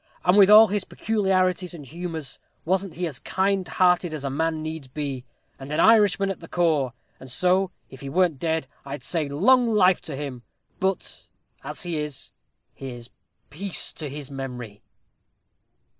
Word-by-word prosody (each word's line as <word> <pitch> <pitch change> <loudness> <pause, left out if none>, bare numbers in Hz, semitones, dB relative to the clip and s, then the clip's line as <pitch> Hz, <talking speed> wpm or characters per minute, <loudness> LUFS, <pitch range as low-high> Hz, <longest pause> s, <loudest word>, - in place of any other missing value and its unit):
And 180 +1 +5
with 200 -1 +7
all 215 +1 +10
his 205 0 -1
peculiarities 185 -4 0
and 150 -4 -10
humors, 160 -1 -6 0.3
wasn't 190 0 0
he 175 +2 -2
as 150 -7 -5
kind 190 -1 0
hearted 180 -3 +2
a 140 -2 -4
man 160 +3 0
as 155 - -5
needs 155 -3 -6
be? 135 -2 -5 0.3
and 135 +2 -8
an 150 - -1
Irishman 205 -3 +5
at 195 - -6
the 165 - -11
core? 155 -9 +1 0.3
And 130 - -11
so, 180 +8 +2 0.2
if 130 - -13
he 140 - -6
wern't 170 -2 +2
dead, 160 -1 -1 0.2
I'd 140 +1 -7
say 160 -5 -2
long 240 - +4
life 190 -5 +4
to 145 - -4
him! 135 -3 -6 0.4
But 190 0 -2 0.3
as - - -5
he 175 -3 -3
is, 150 -3 -5 0.4
here's 125 -3 -8 0.4
peace 190 +5 -1
to 150 -3 -5
his 145 0 -7
memory!" 125 -6 -7
165 Hz, 165 wpm, -24 LUFS, 140-185 Hz, 0.4 s, all